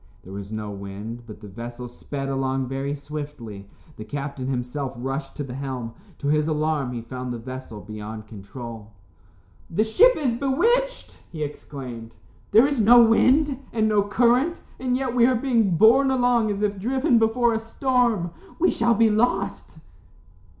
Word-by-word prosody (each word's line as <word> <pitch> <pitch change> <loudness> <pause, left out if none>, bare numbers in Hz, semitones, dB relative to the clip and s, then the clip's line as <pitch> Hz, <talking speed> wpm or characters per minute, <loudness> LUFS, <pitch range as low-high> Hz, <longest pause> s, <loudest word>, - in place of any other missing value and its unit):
There 95 - -11
was 100 +1 -7
no 110 -1 -4
wind, 100 +4 -7
but 105 -2 -11
the 105 - -9
vessel 120 +4 -7
sped 135 +3 -6
along 135 -1 -1
very 135 +2 -3
swiftly. 140 -9 -8 0.3
The 110 - -6
captain 140 +2 -5
himself 130 +1 -3
rushed 135 +5 -4
to 145 - -4
the 130 -3 -7
helm. 130 -4 -5 0.2
To 140 - -4
his 150 +1 +2
alarm 155 -4 0
he 120 -2 -5
found 125 +1 -6
the 120 - -3
vessel 125 -2 -8
beyond 110 0 -8
control. 110 +1 -9 0.8
"The 205 +6 +1
ship 450 - +5
is 270 -6 0
bewitched," 455 - 0
he 155 -3 -4
exclaimed. 125 -6 -8 0.3
"There 225 +4 +6
is 280 -4 +1
no 240 +3 +8
wind, 265 +5 +3
and 220 -1 +1
no 210 -1 +3
current, 245 - +2 0.2
and 250 0 0
yet 260 -2 -2
we 240 -1 +5
are 255 - +3
being 230 -8 +2
borne 245 +7 +6
along 245 -4 +2
as 205 0 -2
if 205 -1 0
driven 255 +4 +2
before 230 +1 +2
a 225 - 0
storm. 230 -5 0 0.3
We 360 - +3
shall 235 0 +2
be 225 0 +4
lost." 200 -6 0
150 Hz, 165 wpm, -24 LUFS, -, 0.8 s, no